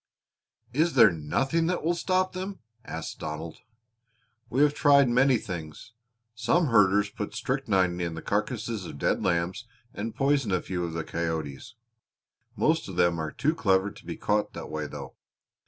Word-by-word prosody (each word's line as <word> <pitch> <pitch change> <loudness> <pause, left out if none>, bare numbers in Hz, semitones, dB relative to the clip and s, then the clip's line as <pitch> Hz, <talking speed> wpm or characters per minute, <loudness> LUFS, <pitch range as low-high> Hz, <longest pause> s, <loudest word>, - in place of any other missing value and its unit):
"Is 160 +5 +2
there 115 -6 +8
nothing 135 - 0
that 180 -2 -1
will 170 +2 +2
stop 185 +2 0
them?" 190 +2 -5 0.3
asked 80 -6 -6
Donald. 80 +1 -6 0.9
"We 135 +4 +3
have 150 -1 +4
tried 140 -2 +5
many 125 +1 +4
things. 85 +1 -7 0.4
Some 155 +8 +1
herders 105 -2 +4
put 105 0 -5
strychnine 95 -9 0
in 85 -2 -2
the 80 - -7
carcasses - - -2
of - - -8
dead - - 0
lambs 90 +6 -1 0.3
and 110 +2 -5
poison 135 -5 +1
a 90 - +2
few 90 -1 -3
of 85 - -5
the 80 -1 -3
coyotes; 80 - -4 0.8
most 160 -6 +1
of 95 - -7
them 85 -1 +2
are 80 -1 -2
too 155 +3 0
clever 95 -8 +2
to - - -15
be - - -5
caught 105 0 0
that - - -7
way, 75 -1 -3
though. - - -8
105 Hz, 165 wpm, -27 LUFS, 85-140 Hz, 0.9 s, there